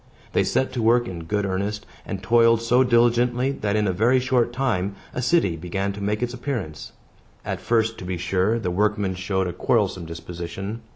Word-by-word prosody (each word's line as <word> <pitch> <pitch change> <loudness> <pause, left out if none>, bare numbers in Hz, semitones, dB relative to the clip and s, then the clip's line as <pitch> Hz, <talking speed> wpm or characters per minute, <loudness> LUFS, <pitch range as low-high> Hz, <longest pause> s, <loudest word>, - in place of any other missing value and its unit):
They - - +3
set 130 - 0
to 125 - -2
work 120 +2 +3
in 85 -5 -6
good 105 +3 -1
earnest, 100 +2 -2 0.2
and - - -5
toiled 115 -1 +5
so 125 +3 +4
diligently, 120 +1 +3
that, 105 -6 -2
in 105 -1 +2
a 95 - +1
very 120 +7 +3
short 125 -2 +1
time, 110 -7 -1 0.2
a 125 - -2
city 125 - +2
began 95 +4 -3
to 100 - -8
make 105 +3 -1
its 120 0 -2
appearance. 120 - -5 0.5
At - - -3
first, 115 -1 +1
to - - -7
be 90 -1 -3
sure, 95 +5 +1
the 90 -6 -2
workmen 105 0 +1
showed 95 +1 -1
a 90 - -4
quarrelsome 85 +1 0
disposition. 85 +6 -6
105 Hz, 190 wpm, -23 LUFS, 95-120 Hz, 0.5 s, toiled